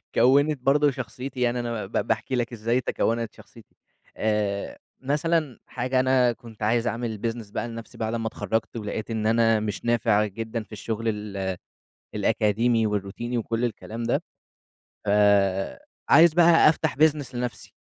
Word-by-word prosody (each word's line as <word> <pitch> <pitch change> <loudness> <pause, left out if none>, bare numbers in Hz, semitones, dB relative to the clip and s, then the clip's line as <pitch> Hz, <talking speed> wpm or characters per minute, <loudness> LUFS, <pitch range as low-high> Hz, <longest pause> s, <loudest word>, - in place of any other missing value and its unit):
كوّنت 140 +4 +4
برضه 145 +2 +3
شخصيتي، 125 +1 -6
يعني 120 0 +1
أنا 115 -3 -3
ب 95 - -14 0.2
باحكي 110 +4 -1
لك 120 0 -2
إزاي 115 +3 0
تكوّنت 115 -1 -1
شخصيتي - - -17 0.4
آآ 105 -2 -1 0.2
مثلًا 150 0 0
حاجة 130 +1 -1
أنا 130 -1 +3
كنت 115 -3 -11
عايز 115 +2 +1
أعمل 115 -3 -3
business 115 -3 -6
بقى 120 - -2
لنَفْسي 115 -1 -9
بعد 110 0 -2
أما 115 -1 -2
اتخرّجت، 110 +2 -3
ولقيت 110 +1 -4
إن 110 -1 -1
أنا 115 0 +3
مش 105 +2 -4
نافع 115 -3 +2
جدًا 110 +2 -5
في - - -26
الشغل 110 +2 -4
ال 100 -3 -3 0.6
الأكاديمي، 115 +2 +2
والروتيني 105 +4 -3
وكُلّ 115 +1 -1
الكلام 115 0 -5
ده. - - 0 0.8
ف 100 - +1 1.0
عايز 160 +1 +7
بقى 170 -2 +6
أفتَح 160 -1 0
business 150 -3 +2
لنَفْسي، 125 0 -5
115 Hz, 150 wpm, -25 LUFS, 110-125 Hz, 1.0 s, عايز